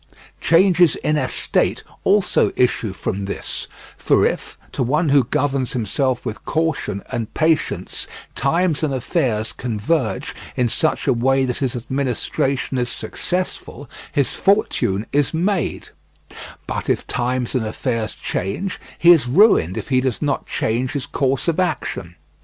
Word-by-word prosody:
Changes 175 -1 +4
in 150 - 0
estate 130 -4 0 0.2
also 200 0 +3
issue 120 -4 +1
from 95 +1 -3
this, 100 - -4 0.3
for - - +3
if, - - -2
to - - -3
one 150 +6 +1
who 140 -3 +5
governs 135 -1 0
himself 125 +3 -1
with 110 - -5
caution 160 -11 -1
and 115 -2 -3
patience, 155 - 0 0.3
times 165 +3 +1
and 145 -4 0
affairs 115 -3 -1
converge 120 +3 -1 0.2
in 125 - +2
such 155 +7 0
a 135 - +4
way 135 +3 +2
that 125 -1 -2
his 130 -2 -1
administration 130 +1 -1
is 120 0 -1
successful, 180 -5 -4 0.2
his 140 -2 +1
fortune 115 - +1
is 145 +2 +1
made; 180 -1 -1 0.8
but - - -4
if - - +1
times 125 0 -1
and 130 -4 +1
affairs 115 -1 -2
change, 145 - -3 0.2
he 175 - +7
is 155 -8 +5
ruined 130 - +4
if - - -5
he 130 -2 +3
does 130 -3 -1
not 145 -2 -1
change 120 +3 -1
his 140 - -2
course 135 +1 -1
of 170 +1 +1
action. 125 - -2
135 Hz, 140 wpm, -20 LUFS, 120-155 Hz, 0.8 s, he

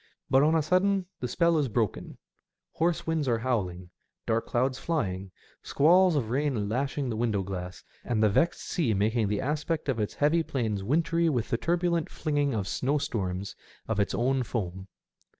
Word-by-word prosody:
But 135 - +6
on 155 +3 +4
a 160 - +2
sudden 185 +3 +2
the 125 - -2
spell 170 +3 +2
is 145 - +1
broken; 115 -2 -2 0.5
hoarse 170 +1 0
winds 160 -3 0
are 120 -2 +2
howling, 95 -7 -2 0.3
dark 115 +1 0
clouds 130 +2 0
flying, 95 - -2 0.3
squalls 175 +4 +4
of 115 -6 -1
rain 130 -6 0
lashing 135 +3 -1
the - - -2
window 110 -4 0
glass, 90 -2 -6 0.2
and 110 -3 0
the - - +6
vexed 130 +12 +1
sea 140 - 0
making 110 +2 +1
the 105 0 -1
aspect 150 +3 -2
of 125 -4 0
its 105 - -2
heaving 160 +3 +2
plains 110 -7 -2
wintry 165 +7 +1
with 120 -7 -1
the 115 - +1
turbulent 170 +1 0
flinging 145 -4 -1
of 100 -3 -2
snowstorms 100 -6 -2 0.3
of 110 -2 -1
its 100 - +1
own 130 +2 +1
foam. 95 -6 -4
130 Hz, 170 wpm, -28 LUFS, 105-155 Hz, 0.5 s, But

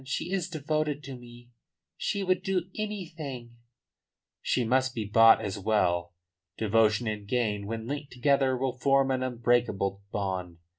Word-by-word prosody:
She 140 +6 -3
is 185 -3 -1
devoted 155 -2 -2
to 135 -1 -7
me; 120 0 -14 0.4
she 200 - -2
would 185 -1 +1
do 185 -1 -2
anything 160 - -6 0.4
" - - -63 0.3
"She 125 - +1
must 130 +2 +1
be 110 -3 -2
bought 115 +2 +7
as 100 -2 -4
well. 90 -4 +1 0.4
Devotion 110 +1 +2
and 105 -2 -4
gain 105 -4 -1
when 110 0 -4
linked 145 +2 -5
together 135 0 +2
will 130 0 -2
form 135 0 +3
an 130 -1 0
unbreakable 120 -5 0
bond. 95 -4 -3
125 Hz, 150 wpm, -28 LUFS, 110-145 Hz, 0.4 s, bought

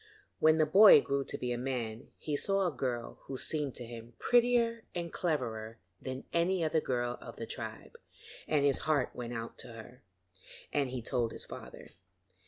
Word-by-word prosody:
When 155 0 +5
the 155 - +4
boy 195 +3 +9
grew 140 0 -1
to - - -4
be 125 - -3
a 120 - -2
man, 120 -3 -3
he 150 - -3
saw 195 +6 +1
a 175 - +1
girl 120 -2 -3
who 135 - -5
seemed 145 -1 -1
to 120 - -5
him 115 0 -10
prettier 235 -1 +3
and 170 -1 -4
cleverer 115 -9 -2 0.2
than 130 0 -5
any 170 +1 +2
other 160 0 +2
girl 120 -2 -1
of - - -9
the - - -5
tribe, - - -7 0.5
and 145 -2 +2
his 140 -2 +3
heart 145 -5 +2
went 120 -1 -5
out 115 0 -6
to 120 - -5
her, 115 +3 -12 0.7
and 140 -3 +1
he 125 -2 -5
told 115 -1 0
his - - -3
father. - - -10
135 Hz, 185 wpm, -32 LUFS, 120-160 Hz, 0.7 s, boy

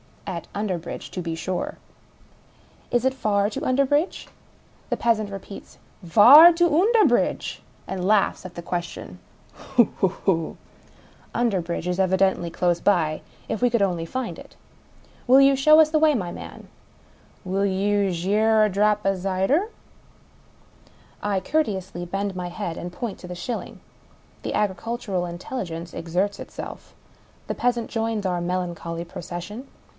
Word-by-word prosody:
(At 175 -4 -5
Underbridge, 185 -5 -4
to 180 - -4
be 165 -1 -4
sure.) 180 +2 -4 0.6
" - - -31
Is 240 - +3
it 265 - +2
far 205 -5 +1
to - - -5
Underbridge? 280 +6 +1 0.3
" - - -32
The - - -1
peasant 220 -3 +1
repeats, 195 0 -10 0.2
" - - -30
Var 295 +11 +10
to 345 +1 +3
Oonderbridge? 420 +9 +2
" - - -31
— - - -31
and 185 -1 -2
laughs 210 -1 +2
at 180 - -9
the 170 - -6
question. 175 0 -5 0.2
" - - -31
Hoo 250 -3 +2
hoo 190 - +3
hoo! 175 -3 -1 0.4
" - - -27
(Underbridge 185 -8 -1
is 180 +1 -2
evidently 190 -2 +2
close 175 +1 0
by 165 -6 +1
— - - -28
if 220 - -3
we 245 - +4
could 235 -2 +1
only 175 -4 -1
find 255 +8 -4
it.) - - -14 0.4
" - - -29
Will 260 +2 +7
you 275 0 +6
show 305 +4 +6
us 315 -1 +6
the 310 - +3
way, 310 -1 +4
my 180 -7 -2
man? - - -10 0.2
" - - -31
" - - -31
Will 195 +2 0
you 200 +1 +1
gi' 185 +5 0
oi 220 0 +4
a 215 - +3
drap 210 +1 +1
of 195 -1 +2
zyder?" 195 - +1 1.5
I 200 -2 0
courteously 190 - -2
bend 195 +2 -3
my 180 -1 -4
head, 175 -2 -5
and 175 - -6
point 215 +3 -5
to 180 - -10
the 180 - -6
shilling. 200 +7 -6 0.6
The - - -3
agricultural 205 -1 -2
intelligence 175 -2 -6
exerts 180 +5 -2
itself. - - -9 0.5
The - - -2
peasant 240 -2 0
joins 225 -2 -2
our 180 -2 0
melancholy 175 -1 -3
procession. 175 +9 -7
195 Hz, 165 wpm, -24 LUFS, 180-235 Hz, 1.5 s, Var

